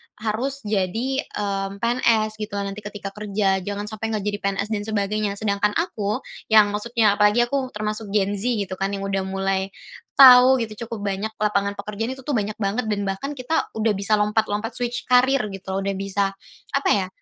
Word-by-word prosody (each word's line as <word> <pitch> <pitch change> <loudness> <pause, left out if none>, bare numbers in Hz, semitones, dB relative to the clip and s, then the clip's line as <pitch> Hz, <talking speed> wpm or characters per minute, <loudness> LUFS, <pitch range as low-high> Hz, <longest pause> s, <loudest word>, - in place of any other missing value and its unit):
harus 235 +6 -3
jadi, 220 +7 -1
mmm, 200 0 -4
PNS 225 -3 +2
gitu 210 -1 -5
nanti 200 +1 -3
ketika 205 -1 -7
kerja 200 -2 0
jangan 205 +2 -4
sampai 215 +1 -4
nggak 205 - -3
jadi 205 0 -1
PNS 200 +1 -2
dan 205 -1 -1
sebagainya, 210 -1 -1
sedangkan 205 0 0
aku, 215 - -1 0.2
yang 215 -2 +6
maksudnya 210 -1 +1
apalagi 210 +3 +5
aku 265 +2 -1
termasuk 215 0 -3
Gen 200 -1 +2
Z 230 - -2
gitu 200 -6 -2
kan 195 +1 -1
yang 195 - -5
udah 195 -1 -1
mulai, 195 0 -1 0.5
tahu 255 0 +10
gitu 220 +1 -7
cukup 225 -3 -6
banyak 205 +3 -3
lapangan 200 -1 0
pekerjaan 210 +5 -4
itu 265 - -13
tuh 295 - -3
banyak 215 -4 -1
banget 215 +3 -1
dan 205 -1 -1
bahkan 195 +9 -3
kita 270 +5 -1
udah 220 0 +1
bisa 200 +1 +1
lompat-lompat 210 +1 0
switch 245 0 -3
career 250 -3 +3
gitu 190 0 -6
loh 195 - -1
udah 200 - 0
bisa, 195 0 -1 0.4
apa 275 - 0
ya, 190 -3 +2
210 Hz, 185 wpm, -23 LUFS, 200-225 Hz, 0.5 s, tahu